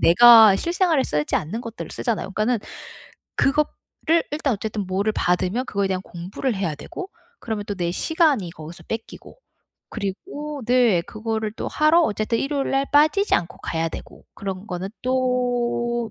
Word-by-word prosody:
내가 220 +2 +8
실생활에 340 - +1
쓰지 150 -8 0
않는 175 +10 -3
것들을 230 -1 -7
쓰잖아요. 225 -4 -2
그러니까는 220 +4 0 0.8
그거를 305 +3 0
일단 295 -2 0
어쨌든 210 -2 -3
뭐를 200 +3 0
받으면 185 +8 0
그거에 200 -4 -1
대한 185 -1 -2
공부를 190 +9 -4
해야 185 -6 -2
되고 370 - -8 0.3
그러면 220 -3 -4
또 205 - -3
내 175 -2 -2
시간이 285 - +1
거기서 160 0 -11
뺏기고 225 - -7 0.5
그리고 285 - -5
네. 240 -8 +4
그거를 220 +2 -4
또 - - -4
하러 310 +3 +4
어쨌든 215 -3 0
일요일 275 +1 -1
날 275 +1 +1
빠지지 310 +8 +4
않고 170 0 -1
가야 165 0 -2
되고 - - -10
그런 195 0 -6
거는 185 -1 -4
또 245 -2 0
225 Hz, 345 characters per minute, -23 LUFS, 190-270 Hz, 0.8 s, 내가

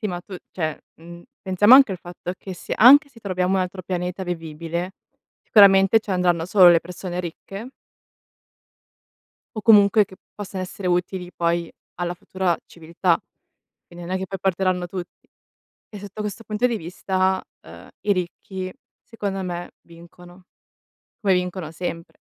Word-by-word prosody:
Sì, 215 - -2
ma 175 -2 -4
tu 185 +1 -9 0.2
cioè, 155 -4 -3 0.2
mhmm, 170 +1 -12 0.2
pensiamo 205 +5 +6
anche 265 -7 +7
al 185 - -6
fatto 175 +1 -7
che 190 - -8
se - - -8
anche 280 +6 +8
se 245 -4 -18
troviamo 185 -2 -1
un 190 - +2
altro 185 +1 -4
pianeta 180 +1 -3
vivibile, 170 +1 -4 0.5
sicuramente 195 0 +6
ci 210 - -9
andranno 180 -3 +1
solo 185 -2 +7
le 170 -1 +5
persone 180 +1 -6
ricche 195 +6 -8 1.9
o 215 - -4
comunque 210 -1 +6
che 190 - -16 0.2
possano 195 -2 -6
essere 185 0 -5
utili 180 0 -1
poi 170 0 -1 0.3
alla 175 0 -2
futura 180 -1 -1
civiltà. 170 +1 -1 0.7
Quindi 175 0 -11
non 185 - -3
è - - 0
che 190 - -4
poi 195 - -6
porteranno 185 -1 0
tutti 175 -1 -9 0.6
e 210 - -8
sotto 205 +1 -8
questo 210 +2 -5
punto 215 +3 0
di 235 -2 -2
vista, 185 +2 -1 0.2
ehm, - - -13
i 205 - +2
ricchi 185 +1 -5 0.3
secondo 200 -4 -4
me 175 -1 -5
vincono, 175 +2 -16 0.8
come 195 -2 +2
vincono 180 -3 -2
sempre. 165 0 -6
185 Hz, 155 wpm, -22 LUFS, 175-195 Hz, 1.9 s, anche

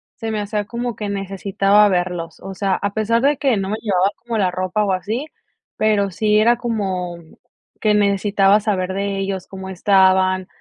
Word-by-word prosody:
se 225 -1 -5
me 215 - -2
hacía 205 0 -3
como 235 +1 -4
que 210 -2 -5
necesitaba 195 +1 +2
verlos, 175 -2 -2
o 195 -1 -8
sea, 195 -1 0
a 200 +2 -2
pesar 230 +2 +1
de 285 0 +2
que 265 -5 +1
no 195 0 -2
me 215 - -2
llevaba 195 -2 +2
como 235 -2 -4
la 185 -2 +2
ropa 185 +3 -1
o 195 -2 0
así, 220 +9 -3 0.5
pero 205 -2 +2
sí 210 +3 +1
era 235 +2 +4
como 190 -7 -3 0.6
que 215 -1 +2
necesitaba 200 0 +3
saber 190 -3 -1
de 200 0 -2
ellos, 195 -1 -3
cómo 190 0 -9
estaban, 185 0 +3
200 Hz, 180 wpm, -20 LUFS, 190-215 Hz, 0.6 s, era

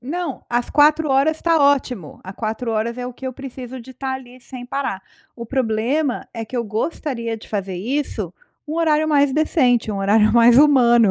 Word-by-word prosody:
Não, 315 +2 -5
as 240 0 0
4 300 +1 +4
horas 280 +4 +2
tá 335 -1 +2
ótimo, 255 - 0
a 190 - -7
4 225 +3 -3
horas 230 +3 -2
é 245 - -4
o 250 - -6
que 265 - -13
eu 260 - -3
preciso 260 -1 -8
de 260 +2 -13
tá 265 +1 -4
ali, 255 -1 -9
sem 245 0 -10
parar. 260 -7 -3 0.4
O 235 -1 -7
problema 255 +3 -1
é 225 -1 -4
que 250 - -7
eu 235 - -1
gostaria 230 +1 -3
de 220 - -14
fazer 195 -3 -3
isso 215 - -3 0.3
um 305 - -4
horário 315 -2 +2
mais 285 -2 +3
decente, 255 -7 +2
um 200 - -3
horário 210 +2 +3
mais 235 +1 +6
humano. 240 -7 +5
250 Hz, 195 wpm, -20 LUFS, 225-280 Hz, 0.4 s, mais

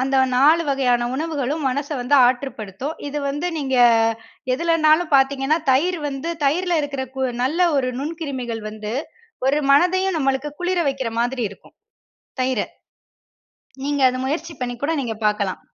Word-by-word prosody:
அந்த 270 +1 +1 0.2
4 305 +6 +5
வகையான 250 -3 +2
உணவுகளும் 300 0 -2
மனச 285 +2 -2
வந்து 250 +4 +1
ஆற்றுப்படுத்தும். 250 - -3
இது 295 - -3
வந்து 290 +5 -2
நீங்க 270 -3 -1 0.8
எதுலனாலும் 320 +2 +3
பார்த்தீங்கன்னா 270 +3 +3
தயிர் 345 +6 +2
வந்து, 280 +4 -4
தயிரில 350 +5 +1
இருக்குற 275 -2 -3
கு 265 - 0 0.2
நல்ல 325 +8 +2
ஒரு 260 -2 +1
நுண்கிருமிகள் 275 -7 -4
வந்து, 215 0 -6 0.5
ஒரு 290 +3 +3
மனதையும் 370 +4 +3
நமக்கு 270 +1 0
குளிர 360 +1 0
வைக்கிற 265 -4 -2
மாதிரி 245 0 -1
இருக்கும். 200 - -17 0.6
தயிர. 255 -4 +1 1.2
நீங்க 285 -1 0
அத 255 - -3
முயற்சி 325 +4 -3
பண்ணி 245 -1 -3
கூட 325 +3 +1
நீங்க 225 -3 -4
பார்க்கலாம். 205 -3 -1
275 Hz, 135 wpm, -21 LUFS, 255-315 Hz, 1.2 s, 4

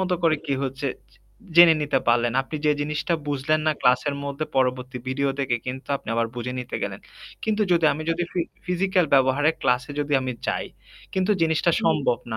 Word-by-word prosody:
মত 190 -1 -1
করে 160 -2 +3
কি 140 - 0
হচ্ছে 135 +1 -3 0.2
জে - - -25 0.4
জেনে 170 -2 +9
নিতে 140 -2 +1
পারলেন। 120 0 +3
আপনি 155 +3 -6
যে 150 - +5
জিনিসটা 150 +3 -1
বুঝলেন 145 +2 0
না 155 - +4
ক্লাসের 125 +3 +2
মধ্যে 140 +2 -3
পরবর্তী 125 -1 0
ভিডিও 140 +1 0
দেখে 125 -3 0
কিন্তু 130 +2 -6
আপনি - - -16
আবার 115 0 +1
বুঝে 120 +1 -3
নিতে 125 - -5
গেলেন। - - -4 0.4
কিন্তু 215 -1 +1
যদি 170 -2 +3
আমি 155 +2 -5
যদি 165 +1 0
ফি 180 - 0 0.3
ফিজিক্যাল 180 -1 +1
ব্যবহারে 135 +3 +4
ক্লাসে 125 +4 +1
যদি 145 0 -3
আমি 130 -1 -3
যাই, - - -1 0.5
কিন্তু 190 +2 +1
জিনিসটা 160 +1 +2
সম্ভব 130 -4 +2
না। 110 - -2
140 Hz, 190 wpm, -24 LUFS, 130-160 Hz, 0.5 s, জেনে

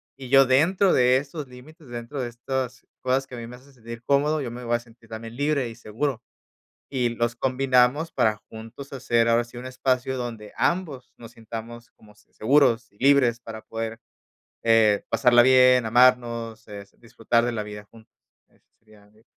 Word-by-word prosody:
y 130 -2 -10
yo 135 0 +6
dentro 175 +9 +3
de 125 +1 +4
esos 145 +1 -6
límites, 140 +4 -15
dentro 120 +3 -6
de 120 - -3
estas 125 +1 -5 0.2
cosas 130 +1 0
que 130 - -16
a - - -8
mí 115 - -7
me 125 - -10
hacen 135 +2 -19
sentir 115 -1 -10
cómodo, 150 +2 +1
yo 120 -3 -5
me 125 +1 -8
voy 120 0 0
a - - -1
sentir 115 -1 -20
también 115 +1 -8
libre 145 -2 0
y - - -9
seguro. 120 +3 -4 0.7
Y 125 -3 0
los 120 0 -2
combinamos 130 +4 +1
para 110 -1 +1
juntos 115 +5 -11
hacer, 120 -3 +1
ahora 115 +1 +3
sí, 120 +1 -14
un 125 +1 -7
espacio 130 0 -1
donde 115 -4 -6
ambos 155 -8 -2
nos 115 0 -13
sintamos 115 +1 -9
como 105 -1 -21
se 105 - -28
seguros 125 -1 +2
y 100 - -29
libres 130 -4 +3
para 110 -2 -9
poder, 115 0 -6 0.7
eh, 110 -3 +4
pasarla 120 -2 +5
bien, 130 -1 +5
amarnos, 115 -2 +2
eh, 100 -1 -8
s 100 - -22
disfrutar 115 0 -1
de 120 - -1
la 110 -2 -3
vida 105 0 -9
juntos. 110 +1 -20 0.4
Eso - - -33
sería 110 -2 -21
de 110 +1 -26
120 Hz, 190 wpm, -24 LUFS, 115-130 Hz, 0.7 s, yo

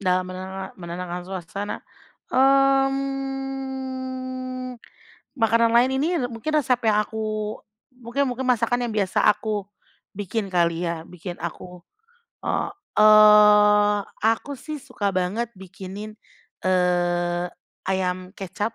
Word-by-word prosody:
Dalam 185 -1 +1
menena 190 +1 -6
menenangkan 175 0 -6
suasana, 190 +2 -5 0.6
mmm, 270 -1 0 0.6
makanan 230 -1 +3
lain 245 +2 +5
ini, 305 - +1
eee, 245 - -2
mungkin 230 +7 -4
resep 255 -4 +2
yang 210 -1 +4
aku 215 -1 -3 0.3
mungkin 250 +2 -2
mungkin 250 +1 -3
masakan 245 0 +2
yang - - -4
biasa 195 -3 +1
aku 210 -1 0 0.5
bikin 205 +1 -3
kali 170 -1 +1
ya 165 -1 -4
bikin 175 +1 -8
aku 175 +1 -7 0.6
heeh. - - -1 0.3
Eee, 210 -1 +7 0.2
aku 225 +6 +1
sih 305 +3 -6
suka 200 -4 -2
banget 195 +6 -1
bikinin, 190 +3 -9 0.5
eee, 175 -1 +1 0.4
ayam 185 -1 -1
kecap. 205 +4 -4
210 Hz, 110 wpm, -24 LUFS, 185-255 Hz, 0.6 s, Eee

